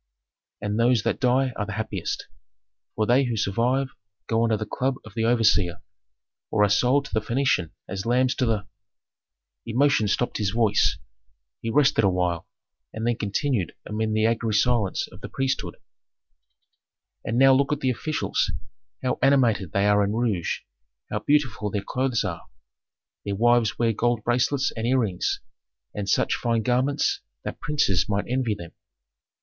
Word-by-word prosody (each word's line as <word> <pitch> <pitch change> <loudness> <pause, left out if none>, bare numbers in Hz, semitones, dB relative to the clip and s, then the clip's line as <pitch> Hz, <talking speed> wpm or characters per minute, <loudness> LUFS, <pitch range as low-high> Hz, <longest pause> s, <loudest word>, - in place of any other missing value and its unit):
And 105 +1 -2
those 120 -2 +3
that - - -1
die 130 0 +2
are 105 - -1
the 105 - -4
happiest, 110 -5 -3 0.7
for 110 - +1
they 125 +4 +3
who 120 -2 -2
survive 125 +7 +1 0.4
go 115 0 +1
under 115 -2 +2
the 110 - -4
club 130 +5 -1
of 110 - -12
the 115 0 -1
overseer, 110 -7 +3 0.7
or 105 - +2
are 105 - +4
sold 125 +7 +3
to - - -11
the 110 - +1
Phœnician 115 - 0 0.2
as 95 0 -4
lambs 125 +2 +2
to 125 - +1
the 105 -3 0 0.5
" - - -63
Emotion 130 -3 +3
stopped 120 +4 0
his 105 -2 +1
voice; 110 -1 +2 0.6
he 115 - -3
rested 135 -2 +3
awhile, 90 -3 0 0.4
and 110 +1 -4
then 120 0 +2
continued 105 - -1
amid 110 +1 -2
the 110 0 +2
angry 115 -1 0
silence 115 -3 +1
of - - -14
the - - -7
priesthood, 135 -1 -2 1.5
"And 115 - -2
now 135 +1 +7
look 140 +3 +2
at 150 0 -1
the 130 - +2
officials, 155 +6 -1 0.5
how 130 - -1
animated 120 - +3
they 100 0 +1
are 105 0 +4
in 100 +1 -1
rouge, 110 -7 -1 0.5
how 105 - -1
beautiful 130 -4 +1
their 100 -1 -3
clothes 130 -3 0
are! 85 -5 -5 0.8
Their 100 -1 -3
wives 120 0 +3
wear 115 -1 +2
gold 120 0 0
bracelets 130 +3 +1
and 115 0 -2
earrings, 115 -8 0 0.5
and 100 -1 -4
such - - +2
fine 115 -2 0
garments 130 +5 +1 0.2
that - - -6
princes 145 - +1
might 100 0 0
envy 125 -3 0
them. 85 -4 -10
115 Hz, 160 wpm, -25 LUFS, 105-125 Hz, 1.5 s, now